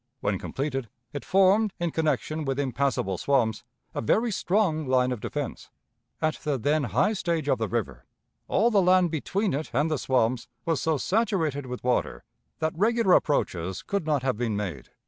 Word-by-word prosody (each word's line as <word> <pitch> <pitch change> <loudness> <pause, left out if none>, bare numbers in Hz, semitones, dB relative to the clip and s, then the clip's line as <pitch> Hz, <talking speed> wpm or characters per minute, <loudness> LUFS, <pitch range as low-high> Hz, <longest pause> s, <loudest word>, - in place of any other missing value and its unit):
When 100 -2 0
completed, 135 -4 -3 0.2
it 145 - -5
formed, 195 +2 +3
in 170 -1 -1
connection 155 0 -1
with 135 -2 -2
impassable 130 -8 0
swamps, 125 -6 +1 0.3
a - - -2
very 220 - +2
strong 180 -7 +1
line 130 -1 +2
of 125 - -3
defense. - - -5 0.5
At 155 0 0
the 145 -3 -2
then 145 +4 +1
high 125 - +2
stage 170 -6 -1
of 130 -4 +2
the 110 - 0
river, 95 - -3 0.4
all 230 +4 +3
the 205 -3 +4
land 180 -1 +4
between 190 +5 -1
it 150 +3 -3
and 150 +6 +1
the 155 - 0
swamps 125 -2 +1 0.2
was 165 -4 0
so 160 -2 +1
saturated 165 - 0
with 125 0 -6
water, 125 - 0 0.3
that 160 -1 -1
regular 220 +1 +3
approaches 95 - +1
could 200 -5 -2
not 145 -4 +1
have 130 -5 0
been 115 -3 -1
made. 90 -11 -5
145 Hz, 175 wpm, -26 LUFS, 125-175 Hz, 0.5 s, the